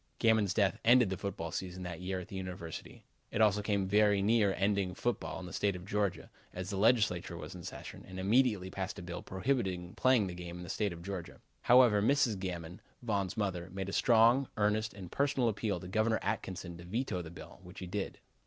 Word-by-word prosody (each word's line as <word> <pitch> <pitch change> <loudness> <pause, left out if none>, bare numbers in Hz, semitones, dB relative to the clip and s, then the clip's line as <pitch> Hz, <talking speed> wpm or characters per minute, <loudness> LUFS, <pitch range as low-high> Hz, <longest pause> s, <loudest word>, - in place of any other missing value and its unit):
Gammon's 110 -4 +3
death 105 +1 +2
ended 120 -3 +6
the - - 0
football 95 -4 -4
season 90 +1 -5
that 90 -1 -6
year 95 0 -2
at 90 - -8
the - - -9
University. 90 -3 -7 0.2
It - - -3
also 105 -1 +4
came 100 -2 0
very 105 0 +4
near 105 0 +3
ending 95 -2 +1
football 120 -4 -2
in 95 - -7
the 90 - -9
State 100 -1 +1
of 90 0 -8
Georgia, 100 -1 -1 0.2
as 90 +1 -5
the - - -2
Legislature 100 -6 +2
was 80 +1 -7
in 90 - -9
session, - - -8
and 95 0 -7
immediately 105 -2 +2
passed 95 +1 -4
a 95 - -7
bill 85 0 -6
prohibiting 95 -4 -1
the - - -14
playing 130 0 +4
of 95 - -3
the - - -5
game 90 0 -7
in 90 - -7
the 90 - -9
State. 105 -1 -1 0.7
However, 120 -4 +6
Mrs. 115 -3 +2
Gammon 90 -1 -5 0.2
Von's 100 -3 -1
mother 95 -4 -2
made 95 +1 -4
a - - -5
strong, 120 +3 +5
earnest 105 +1 +1
and 95 -3 -9
personal 135 -3 +1
appeal 105 -1 -1
to 90 - -8
Governor 110 +3 +2
Atkinson 95 -4 -3
to 85 - -10
veto 95 0 -2
the 85 - -8
bill, 80 0 -11
which 90 0 -13
he 95 - -5
did. 95 +2 -4
95 Hz, 210 wpm, -33 LUFS, 90-110 Hz, 0.7 s, ended